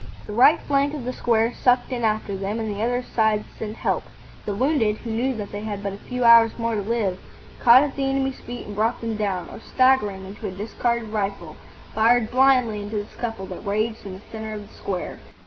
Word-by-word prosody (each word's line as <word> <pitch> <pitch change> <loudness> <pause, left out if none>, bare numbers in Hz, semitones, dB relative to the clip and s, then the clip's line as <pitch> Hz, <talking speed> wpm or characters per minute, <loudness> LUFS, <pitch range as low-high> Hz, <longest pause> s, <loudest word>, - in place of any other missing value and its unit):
The 210 - -7
right 255 +7 +6
flank 285 +1 0
of 265 -5 -6
the 255 - -3
square 230 -1 +1
sucked 250 +1 +2
in 245 -2 -2
after 215 -2 0
them, 200 +3 -3
and 220 -1 -2
the 205 - -4
other 245 +2 0
sides 220 -3 +1
sent 215 0 -5
help. - - -1 0.4
The 205 - -1
wounded, 240 -3 +1
who 230 - -6
knew 250 +4 0
that 210 -2 -6
they 205 - -5
had 205 -2 -5
but 200 -1 -3
a - - -7
few 250 +4 -4
hours 230 -1 +7
more 230 -1 -1
to 210 - -1
live, 200 -3 -1 0.4
caught 245 +3 +7
at 290 -2 -3
the 275 - -1
enemy's 270 -1 -1
feet 245 0 -8
and 205 - -8
brought 225 +4 0
them 225 -1 -3
down, 200 -4 -2
or, - - -9
staggering 225 -7 +2
into 195 +2 -7
a - - -4
discarded 225 +3 -2
rifle, 195 -6 -3 0.4
fired 225 +1 +3
blindly 250 -5 +3
into 205 +2 -6
the 205 -1 -2
scuffle 225 -3 -5
that - - -8
raged 215 +2 -1
in 195 - -7
the 190 - -10
centre 220 -1 -6
of 205 -1 -8
the - - -19
square. 185 -3 -5
220 Hz, 225 wpm, -23 LUFS, 205-245 Hz, 0.4 s, hours